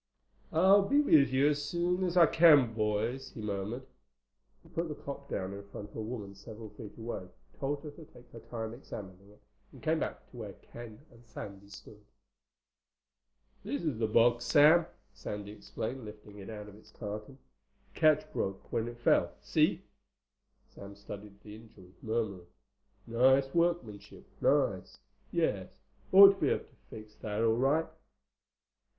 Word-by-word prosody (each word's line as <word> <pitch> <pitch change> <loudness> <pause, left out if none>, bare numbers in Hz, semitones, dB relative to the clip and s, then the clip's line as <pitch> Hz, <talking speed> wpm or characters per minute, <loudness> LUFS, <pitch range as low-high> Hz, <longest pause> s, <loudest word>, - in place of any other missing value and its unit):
"I'll 190 +5 +6
be 280 +9 +2
with 155 - +5
you 135 +3 +3
as 145 0 -1
soon 175 +4 0
as 180 -1 -1
I 170 - +9
can, 150 -8 +6
boys," 110 +5 -1
he - - -7
murmured. 105 +4 -4 0.8
He - - -19
put 170 +1 -2
the 150 - -5
clock 140 -1 -8
down 95 0 -3
in 100 - -7
front 100 0 -9
of - - -18
a - - -4
woman 110 -3 -6
several 110 +2 -11
feet 105 0 -11
away, 115 -5 -5 0.3
told 145 +1 -2
her 150 - -7
to 155 +2 -13
take 125 - -18
her 115 - -10
time 115 -1 -6
examining 100 -6 -10
it, 105 - -20 0.3
and - - -15
came 160 0 +1
back - - -5
to 125 - -13
where 105 -4 -7
Ken 120 +6 -12
and 120 0 -18
Sandy 100 -2 -9
stood. 105 +1 -13 1.6
"This 145 +4 -3
is 145 -9 -2
the 110 - +1
box, 120 +2 +3
Sam," 155 +5 +6 0.3
Sandy 105 0 -6
explained, 110 +4 -6
lifting 105 -1 -11
it 95 - -9
out 105 -1 -7
of 105 - -12
its 110 - -19
carton. 105 +4 -7 0.6
"The - - -13
catch 155 -1 +3
broke 95 0 -4
when 115 0 0
it 120 0 -7
fell. 120 - +2
See?" - - +2 0.8
Sam 100 0 -12
studied 100 0 -10
the 105 0 -10
injury, 105 -5 -16
murmuring, 110 -6 -2 0.6
"Nice 130 +3 +3
workmanship. 170 -12 -1 0.2
Nice. - - +1 0.3
Yes—ought 195 +1 +4
to 195 - -14
be - - +3
able - - -1
to - - -26
fix 110 -1 -11
that 105 +1 -3
all 115 -1 +4
right." 140 +6 +2
115 Hz, 165 wpm, -31 LUFS, 105-145 Hz, 1.6 s, I